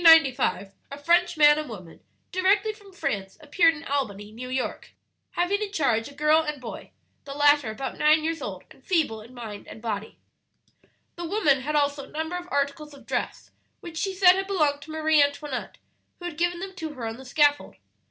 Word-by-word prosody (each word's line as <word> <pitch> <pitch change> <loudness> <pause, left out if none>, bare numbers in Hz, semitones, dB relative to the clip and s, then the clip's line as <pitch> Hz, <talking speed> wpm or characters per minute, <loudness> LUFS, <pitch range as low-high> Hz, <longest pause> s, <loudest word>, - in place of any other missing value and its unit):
"In - - -4
1795 270 -11 +5 0.2
a 280 - -6
French 345 +1 +3
man 295 0 +7
and 305 - -5
woman, 185 -7 -10 0.3
directly 390 +4 +2
from 410 -2 -17
France, 195 - -3
appeared 325 +2 +3
in 295 - -10
Albany, 210 -7 -3
New 250 +3 -8
York, 255 0 -4 0.4
having 385 +4 0
in 415 -2 -3
charge 235 - +1
a 285 - -15
girl 300 +2 +4
and 300 -2 -4
boy; 235 -3 -8 0.4
the 275 0 -7
latter 290 -4 +4
about 220 +5 -5
nine 310 +1 +4
years 325 +1 -2
old, - - -6
and - - -18
feeble 310 - 0
in 235 +4 -14
body 220 -4 -7
and - - -10
mind. 215 -2 -4 1.0
"The 345 - -4
woman 320 -8 +2
had 300 +3 -2
also 285 -1 +1
a - - -18
number 320 +3 -3
of 355 0 -5
articles 285 +1 -2
of 275 - -16
dress - - -4 0.3
which 335 -2 -9
she 385 +2 -2
said 365 -1 +7
had 385 0 -2
belonged 305 -7 +1
to 315 - -10
Marie 315 -1 +3
Antoinette, 285 -2 -2 0.4
who 350 - -10
had 350 -3 -5
given 350 +1 0
them 385 0 -6
to 320 -3 -5
her 240 -3 -5
on 225 0 -4
the 265 - -11
scaffold. 290 +2 +2
295 Hz, 200 wpm, -26 LUFS, 260-340 Hz, 1.0 s, man